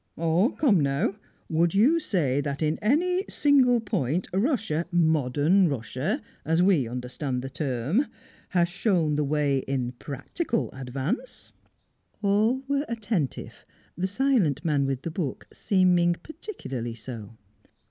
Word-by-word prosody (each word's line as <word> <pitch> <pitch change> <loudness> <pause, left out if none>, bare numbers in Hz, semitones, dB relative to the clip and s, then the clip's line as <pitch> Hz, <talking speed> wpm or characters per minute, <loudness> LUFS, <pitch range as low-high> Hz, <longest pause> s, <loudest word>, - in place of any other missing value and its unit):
"Come 190 - +2
now, 140 +9 +1 0.3
would 165 +2 +1
you 270 +12 +5
say 145 - 0
that 140 +1 -3
in 155 +1 0
any 360 - +2
single 260 -4 +4
point 175 - -1
Russia, 200 - 0
modern 160 +2 +3
Russia, 140 - -2 0.2
as 165 +2 +1
we 175 -10 +3
understand 125 +2 -4
the 135 - -6
term, 140 - 0 0.4
had 175 -2 +2
shown 175 -4 +1
the 150 - +1
way 145 -1 +1
in 130 -2 -2
practical 145 - -3
advance?" 135 - -5 0.7
All 215 +6 +2
were 280 +1 0
attentive 210 - -3 0.3
the 185 +2 -1
silent 200 - +1
man 145 -4 +2
with 135 -1 -3
the 165 - -3
book 155 -6 -4
seeming 180 -3 +3
particularly 130 - -6
so. 115 -2 -9
165 Hz, 125 wpm, -26 LUFS, 135-215 Hz, 0.7 s, you